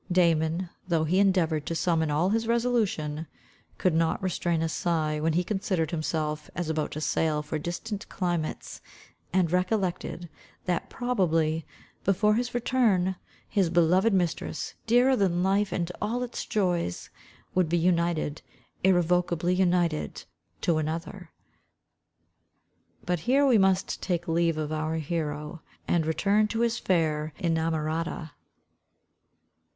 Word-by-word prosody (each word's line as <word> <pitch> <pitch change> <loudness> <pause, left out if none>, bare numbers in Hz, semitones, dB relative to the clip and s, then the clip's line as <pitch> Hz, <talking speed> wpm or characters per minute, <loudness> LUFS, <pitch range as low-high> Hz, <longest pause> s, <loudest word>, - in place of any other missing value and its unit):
Damon, 170 0 +2 0.2
though 165 -3 +2
he 175 +5 +2
endeavoured 170 -6 +2
to 165 - -2
summon 160 -2 +1
all 155 +5 +2
his 225 +1 0
resolution, 215 -11 0 0.5
could 185 - +2
not 165 0 +1
restrain 175 -3 0
a - - +1
sigh 160 -2 -1
when 160 +1 +1
he 175 +2 +2
considered 185 -4 -1
himself 155 -2 -2
as 170 -2 -2
about 155 -1 -1
to 155 - -4
sail 155 -1 0
for 155 +1 -3
distant 200 +6 -5
climates, 175 -4 -3 0.5
and 180 -3 +2
recollected, 180 -2 -1 0.4
that 175 -2 -1
probably, 165 -10 0 0.4
before 210 +2 +3
his 245 +2 -1
return, 225 -7 +2 0.3
his 195 -5 +1
beloved 175 +5 +4
mistress, 180 -4 -1
dearer 245 +3 +5
than 180 -5 +1
life 195 +1 +2
and 175 -1 -2
all 235 +4 -1
its 245 - -5
joys, 180 - -1 0.4
would 180 -3 +2
be 175 - +2
united, 170 -3 +1 0.4
irrevocably 175 -1 +2
united 175 -4 +1 0.4
to 165 -2 +2
another. 165 +3 -4 1.8
But 180 -1 0
here 280 +2 +5
we 245 -5 +5
must 190 -1 +1
take 175 -2 -2
leave 165 -1 +1
of 155 -1 -3
our 155 +1 -1
hero, 155 0 -3 0.3
and 165 -3 +1
return 200 +6 +2
to 225 +2 -2
his 235 0 +1
fair 155 -4 0
inamorata. 160 -1 -1
175 Hz, 130 wpm, -27 LUFS, 160-190 Hz, 1.8 s, dearer